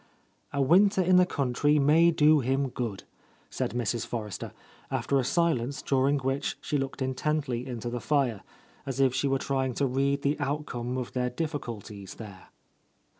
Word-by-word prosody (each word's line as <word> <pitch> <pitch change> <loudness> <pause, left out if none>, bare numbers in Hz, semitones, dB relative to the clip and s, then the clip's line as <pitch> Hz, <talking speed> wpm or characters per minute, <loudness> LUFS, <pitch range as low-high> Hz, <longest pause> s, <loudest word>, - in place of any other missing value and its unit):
"A 140 -1 +1
winter 190 +6 +4
in 180 +1 +5
the 180 0 +5
country 145 0 +1
may 155 +4 +5
do 155 -2 +5
him 135 +1 0
good," 115 -6 -4 0.5
said 105 - -3
Mrs. 120 -1 -1
Forrester, 105 -5 -5 0.4
after 140 - 0
a - - +1
silence 140 -4 0
during 135 +1 +2
which 135 +1 -2
she - - -3
looked 135 0 -3
intently 130 -2 -1
into 120 -2 -5
the 120 0 -3
fire, 135 -8 +1 0.5
as 135 -1 -3
if 135 -2 +4
she 130 +2 0
were 135 0 +2
trying 130 -2 -1
to 140 - +1
read 140 +2 0
the 145 +2 0
outcome 135 -4 -3
of 125 -2 -4
their 125 -1 -1
difficulties 115 - -5
there. 100 -4 -11
135 Hz, 165 wpm, -28 LUFS, 120-145 Hz, 0.5 s, in